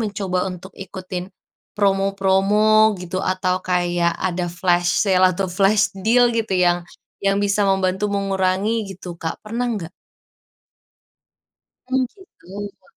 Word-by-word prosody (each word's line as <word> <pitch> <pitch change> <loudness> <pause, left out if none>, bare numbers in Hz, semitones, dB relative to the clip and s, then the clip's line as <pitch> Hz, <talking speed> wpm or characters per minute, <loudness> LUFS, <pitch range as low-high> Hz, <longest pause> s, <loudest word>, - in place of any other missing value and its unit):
mencoba 200 -4 -2
untuk 180 +1 -10
ikutin 185 -1 -7 0.5
promo-promo, 195 +2 +3
gitu? 185 +1 -4
Atau 185 0 0
kayak 175 -1 +1
ada 180 -1 -2
flash 175 0 +1
sale, 185 -1 +4
atau 190 +2 -2
flash 200 +3 +2
deal 240 +1 +4
gitu, 225 -3 -1
yang 175 -1 +3 0.4
yang 195 0 +2
bisa 205 0 +1
membantu 195 +1 +1
mengurangi 195 +2 0
gitu, 180 -2 -8
Kak, 165 -1 -5
pernah 240 +3 -2
nggak? 185 -7 -4 2.0
Oh, 265 - +2
gitu. 205 - -11
195 Hz, 115 wpm, -21 LUFS, 180-205 Hz, 2.0 s, sale